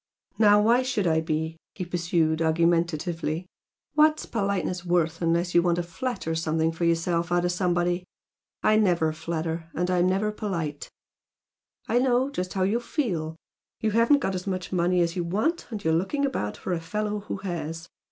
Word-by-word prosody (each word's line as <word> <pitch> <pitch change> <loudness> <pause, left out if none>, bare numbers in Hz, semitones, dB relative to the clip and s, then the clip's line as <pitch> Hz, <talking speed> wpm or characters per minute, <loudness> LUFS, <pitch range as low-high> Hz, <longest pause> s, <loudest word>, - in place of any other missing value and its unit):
"Now, 210 -1 +6
why 235 +3 +4
should 255 -6 -1
I 160 -1 +3
be?" 160 0 -2 0.2
he 185 - -4
pursued, 170 -2 0
argumentatively 165 0 +1 0.5
"What's 305 +1 +4
politeness 195 -5 -1
worth 170 -2 0
unless 170 +1 +1
you 175 - +6
want 175 -1 +2
to 175 - -1
flatter 190 0 -3
something 160 0 0
for 165 +1 -2
yourself 170 +1 +1
out 175 0 +2
of 175 - +1
somebody? 175 0 0 0.6
I 215 - +4
never 175 -7 +2
flatter, 165 0 -4
and 180 +2 0
I'm 180 0 +3
never 200 +3 +1
polite. 170 -9 -4 1.0
I 240 - +3
know 255 +1 +2
just 180 -8 -3
how 190 - +1
you 205 +5 +2
feel, 185 - -2 0.4
you 220 - 0
haven't 230 +6 +4
got 195 - -1
as 185 +1 -4
much 185 -2 -3
money 180 0 +2
as 170 0 0
you 175 - -1
want 215 - -1
and 215 -4 -6
you're 160 - +2
looking 195 - +1
about 105 - -2
for 185 - -3
a 170 - -1
fellow 210 +5 -2
who 205 - -5
HAS. 165 -3 -5
175 Hz, 175 wpm, -26 LUFS, 165-205 Hz, 1.0 s, Now